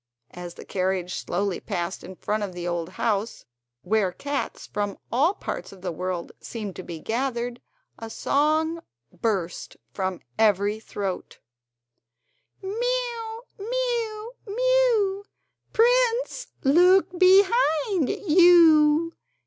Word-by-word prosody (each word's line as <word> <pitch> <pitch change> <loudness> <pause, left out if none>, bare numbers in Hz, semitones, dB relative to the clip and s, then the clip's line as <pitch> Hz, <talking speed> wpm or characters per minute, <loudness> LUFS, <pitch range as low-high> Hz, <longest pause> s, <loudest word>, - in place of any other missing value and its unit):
As 175 -1 -8
the - - -11
carriage 185 -1 -1
slowly 195 0 -2
passed 175 +2 -4
in 190 - -9
front 210 +4 -2
of 200 -3 -4
the 175 0 -5
old 175 -1 -2
house, 220 -1 -1 0.4
where 200 -1 +1
cats 285 +9 -4
from 205 -1 -3
all 300 - +2
parts - - -6
of 190 -2 -15
world 180 0 -3
seemed 210 -5 -6
to - - -5
be 170 -2 -7
gathered 240 +2 -2 0.4
a 225 - -7
song 310 +6 +1 0.3
burst 190 -7 -3 0.2
from 190 -2 -3 0.2
every 210 0 +3
throat: 200 -4 -5 1.3
Mew, 465 +1 -2 0.2
mew, 465 0 -2
mew! 460 -3 +2 0.5
Prince, - - +2 0.2
look 360 +8 +5
quick 360 - -9
behind 375 - +4
you! 330 -3 +5
290 Hz, 110 wpm, -25 LUFS, -, 1.3 s, look